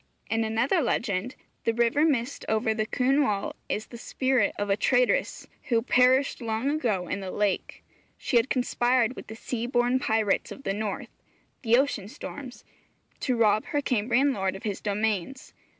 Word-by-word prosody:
In 225 0 +2
another 230 +10 +1
legend, 230 -3 -1 0.3
the 230 - 0
river 235 +5 +2
mist 270 -4 0
over 220 +1 +1
the 215 0 -2
Cynwal 255 -6 +1 0.2
is 215 - -2
the 235 - -11
spirit 260 -3 0
of 205 - -2
a 195 - +2
traitress 245 +3 +1 0.2
who 230 -3 +1
perished 255 +2 +3
long 230 +4 -1
ago 220 - -1
in 200 - -2
the 190 -1 -5
lake. 205 0 -2 0.3
She 245 - +1
had 235 +3 +2
conspired 245 -1 +1
with - - -9
the 220 - -8
sea 235 +1 -4
born 245 +1 +2
pirates 220 -4 0
of 275 - -9
the 195 - -1
North 210 -1 -4 0.5
(the 235 -2 +4
ocean 260 -8 0
storms) 255 +3 -9 0.6
to 255 - 0
rob 215 -2 +3
her 290 - -1
Cambrian 250 +4 +2
lord 190 -4 -1
of 195 - -9
his 205 -3 -3
domains. 210 +3 -2
235 Hz, 165 wpm, -27 LUFS, 210-255 Hz, 0.6 s, the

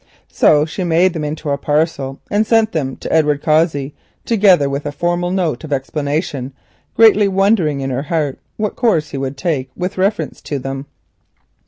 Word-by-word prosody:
So 150 0 +4
she 165 +4 -5
made 175 +1 +3
them 160 -3 -4
into 150 0 -3
a 140 - -1
parcel 145 -3 -1
and 205 +1 +3
sent 225 -1 +3
them 135 -5 -2
to - - -5
Edward 150 -3 +2
Cossey, 155 -3 +1 0.3
together 195 -10 +4
with 140 +1 -3
a - - -3
formal 175 +3 -1
note 175 -8 -1
of 155 - -8
explanation, 140 -1 -2 0.4
greatly 215 -2 +6
wondering 195 -7 +2
in 135 0 -3
her 130 +1 -1
heart 150 -2 -2 0.2
what 210 -1 -2
course 185 - +1
he - - -4
would 135 0 -4
take 145 -7 -2
with 180 +1 -4
reference 190 -5 -1
to 145 - -4
them. 135 +1 -5
155 Hz, 175 wpm, -17 LUFS, 140-185 Hz, 0.4 s, greatly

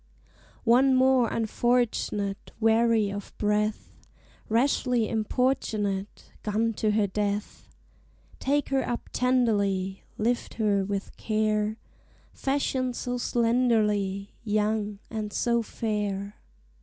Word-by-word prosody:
One 260 +3 +5
more 260 -2 +4
unfortunate, 225 -3 0
Weary 225 -2 +3
of 205 0 -7
breath, 210 0 -1 0.5
Rashly 240 -1 +2
importunate, 215 -4 -1
Gone 220 +2 0
to 215 - +1
her 210 -1 +3
death! 205 +1 -3 0.7
Take 285 +2 0
her 270 -1 +2
up 240 - -4
tenderly, 200 -7 +1 0.2
Lift 235 +3 -1
her 205 -3 +2
with 200 0 -4
care! 215 0 0 0.6
Fashioned 265 -2 -1
so 245 0 -3
slenderly, 215 -5 +1
Young, 210 -1 0
and 215 -2 -3
so 235 +2 +1
fair! 205 -3 -3
220 Hz, 95 wpm, -27 LUFS, 205-240 Hz, 0.7 s, One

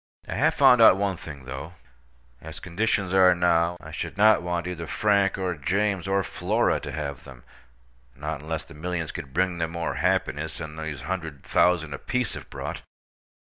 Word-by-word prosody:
I - - -4
have - - +2
found 125 -2 +6
out 105 -4 +8
one 100 -1 0
thing, 70 -5 -10
though. 70 +6 -7 0.7
As - - -9
conditions 95 +1 -1
are 90 -1 +6
now, 85 0 +2
I - - -11
should - - -5
not 110 -2 +6
want 85 0 -2
either 85 -2 -5
Frank, 100 -2 +2
or 95 -2 -1
James, 95 +5 -1
or 95 0 +1
Flora - - 0
to 75 - -7
have 70 -2 -5
them—not 65 +2 -11
unless 80 +1 -4
the - - -14
millions 80 +1 -3
could 75 -7 -7
bring 90 +3 0
them 80 0 -2
more 85 -1 -2
happiness 75 +2 0
than 80 -2 -7
these 80 -3 -5
hundred 80 -4 -5
thousand 85 -4 +2
apiece 125 - -2
have - - -9
brought. - - -6
85 Hz, 175 wpm, -25 LUFS, 75-95 Hz, 0.7 s, out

